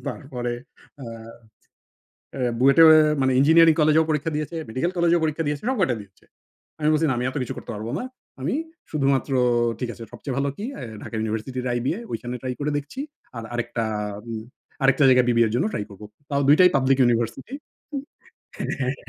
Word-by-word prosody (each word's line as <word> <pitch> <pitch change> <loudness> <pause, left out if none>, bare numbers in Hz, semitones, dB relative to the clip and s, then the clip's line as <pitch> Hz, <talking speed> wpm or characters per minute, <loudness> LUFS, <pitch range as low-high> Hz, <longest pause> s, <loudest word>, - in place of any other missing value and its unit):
তারপরে 125 -4 -4 0.5
আ - - -6 1.3
অ্যা 125 -3 -1
বুয়েটে 140 +5 +6
এও - - +9 0.3
মানে 130 0 +2
ইঞ্জিনিয়ারিং 160 +3 +6
কলেজেও 155 +1 +4
পরীক্ষা 155 +1 0
দিয়েছে, 155 +2 -4
মেডিকেল 130 +10 -1
কলেজেও 170 0 +3
পরীক্ষা 155 +1 -1
দিয়েছে। 145 0 -2
সব 260 - 0
কয়টা 130 -10 +2
দিচ্ছে। 100 -2 -21 0.6
আমি 150 - +2
বলছি, 155 +1 +2
"না - - +1
আমি 125 - -2
এতো 130 - -3
কিছু 125 - -5
করতে - - -8
পারব 105 +2 -6
না। - - -4 0.4
আমি 135 - -1 0.4
শুধুমাত্র 140 -2 +1 0.5
ঠিক 125 - -2
আছে। 115 - -11
সবচেয়ে 135 - -6
ভালো 140 0 0
কি 205 - -6
অ্যা - - -8 0.2
ঢাকা - - -8
ইউনিভার্সিটির 110 +4 -3
আইবিএ। 120 - -1
ঐখানে 125 0 -4
ট্রাই 130 -1 -3
করে 145 +1 -1
দেখছি। 145 - -5 0.4
আর 115 - -5
আরেকটা 120 -1 -2 0.4
উম 110 -1 -4 0.4
আরেকটা 135 +1 +4
জায়গায় 125 -1 +5
বিবিএর 115 -2 +3
জন্য 120 - +1
ট্রাই 105 - -2
করবো। 100 +1 -11 0.3
তাও 140 0 +1
দুইটাই 180 +5 +7
পাবলিক 135 0 +2
ইউনিভার্সিটি।" 120 - 0 0.4
উ - - -1 0.9
হ্যাঁ। 130 +1 -1
135 Hz, 175 wpm, -23 LUFS, 120-155 Hz, 1.3 s, এও